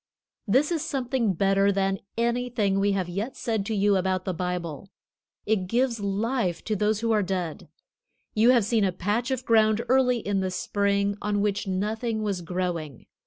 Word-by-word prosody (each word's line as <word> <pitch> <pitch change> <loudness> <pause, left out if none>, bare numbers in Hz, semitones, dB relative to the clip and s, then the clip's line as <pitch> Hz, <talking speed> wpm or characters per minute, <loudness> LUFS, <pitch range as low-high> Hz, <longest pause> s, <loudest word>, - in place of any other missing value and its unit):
This 270 - +3
is 325 -3 0
something 255 -8 0
better 195 +2 +3
than 195 -1 0 0.2
anything 235 -4 0
we 200 0 +2
have 190 -3 -1
yet 200 +9 -4
said 220 -4 -1
to 220 - -1
you 205 0 +3
about 185 0 -1
the 185 - -1
Bible. 180 -1 -4 0.6
It 205 -4 0
gives 235 +2 +1
life 200 -2 -1
to 215 - -1
those 210 +1 +1
who 230 0 +1
are 215 -1 +3
dead. 180 -4 -3 0.6
You 220 +3 +4
have 240 -5 +5
seen 225 -1 +2
a 190 - +2
patch 205 +7 -1
of 260 -1 -2
ground 220 0 +3
early 255 -1 +4
in 205 -3 -1
the 190 -1 -1
spring 200 +2 0
on 210 -1 0
which 205 0 -1
nothing 215 +4 -2
was 200 -4 -2
growing. 170 -6 -4
205 Hz, 175 wpm, -26 LUFS, 190-230 Hz, 0.6 s, have